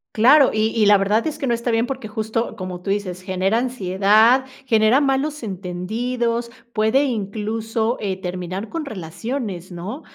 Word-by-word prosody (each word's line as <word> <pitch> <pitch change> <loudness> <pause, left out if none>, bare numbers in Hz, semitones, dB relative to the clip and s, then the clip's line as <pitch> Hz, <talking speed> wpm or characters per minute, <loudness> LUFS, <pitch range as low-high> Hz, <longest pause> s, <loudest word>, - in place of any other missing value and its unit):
Claro, 260 +5 +6
y 215 0 +1
y 215 -2 +3
la 205 0 +7
verdad 205 +3 +1
es 310 - -3
que - - -3
no 240 - +1
está 235 +1 -2
bien 230 0 +2
porque, 260 -3 -5
justo, 220 +2 -3
como 185 -3 -6
tú 195 - -6
dices, 195 -3 -2
genera 190 +3 0
ansiedad, 220 +1 +3 0.2
genera 225 +2 +4
malos 280 +1 0
entendidos, 230 +6 -2 0.2
puede 220 +6 +3
incluso, 225 0 -2
eh, 190 -3 -3
terminar 185 +3 -5
con 330 -2 -4
relaciones, 195 - -5
¿no? 185 - -6
220 Hz, 160 wpm, -21 LUFS, 195-245 Hz, 0.2 s, la